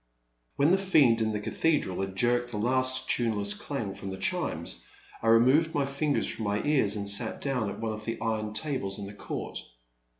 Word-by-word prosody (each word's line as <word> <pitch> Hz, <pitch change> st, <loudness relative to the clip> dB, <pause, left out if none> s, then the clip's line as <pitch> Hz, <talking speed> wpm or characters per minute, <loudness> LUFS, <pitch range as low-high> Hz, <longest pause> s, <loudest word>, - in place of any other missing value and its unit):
When 145 Hz, +4 st, +3 dB
the 190 Hz, -, +4 dB
fiend 140 Hz, -12 st, +4 dB
in 110 Hz, 0 st, +1 dB
the 105 Hz, -, -2 dB
cathedral 110 Hz, -, 0 dB
had 95 Hz, -1 st, -4 dB
jerked 120 Hz, +3 st, +1 dB
the 115 Hz, -, -5 dB
last 130 Hz, +3 st, +1 dB
tuneless 105 Hz, -4 st, +1 dB
dang 110 Hz, -4 st, -4 dB
from 95 Hz, 0 st, -7 dB
the 95 Hz, -, -5 dB
chimes, 95 Hz, -, -2 dB, 0.4 s
I 115 Hz, -, -2 dB
removed 130 Hz, +8 st, +4 dB
my 145 Hz, -1 st, +2 dB
fingers 140 Hz, +1 st, 0 dB
from 110 Hz, -, -4 dB
my 100 Hz, 0 st, 0 dB
ears 135 Hz, -9 st, +2 dB
and 100 Hz, -1 st, -3 dB
sat 100 Hz, +3 st, +2 dB
down 125 Hz, -7 st, -1 dB
at -, -, -7 dB
one 110 Hz, -1 st, -2 dB
of 105 Hz, 0 st, -8 dB
the 115 Hz, 0 st, -3 dB
iron 110 Hz, -2 st, -2 dB
tables 120 Hz, -7 st, -2 dB
in 100 Hz, -, -5 dB
the 100 Hz, -, -8 dB
court. -, -, -5 dB
115 Hz, 200 wpm, -28 LUFS, 105-135 Hz, 0.4 s, the